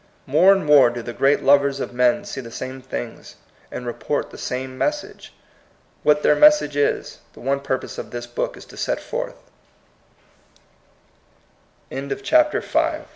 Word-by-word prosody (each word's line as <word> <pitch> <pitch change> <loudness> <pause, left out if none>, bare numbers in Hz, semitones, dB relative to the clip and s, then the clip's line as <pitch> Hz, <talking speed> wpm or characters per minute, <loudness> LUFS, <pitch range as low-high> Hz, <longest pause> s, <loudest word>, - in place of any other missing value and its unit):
More 165 +8 +5
and 195 -4 +2
more 145 -4 +6
do 120 0 -6
the 120 - -6
great 135 +3 +2
lovers 140 0 +4
of 125 - -5
men 125 +11 +2
see 195 -9 -6
the 115 - -10
same 130 +3 -7
things, 120 -2 -7 0.3
and 125 - -7
report 120 - -3
the - - -11
same 130 +1 -4
message. 295 - -3 0.7
What 150 0 +3
their - - +5
message 300 - +5
is, 145 0 -1
the - - -15
one 140 +2 -1
purpose 135 -2 -4
of - - -7
this 120 0 -6
book 120 - -4
is - - -12
to - - -15
s - - -4
135 Hz, 140 wpm, -22 LUFS, 125-150 Hz, 0.7 s, more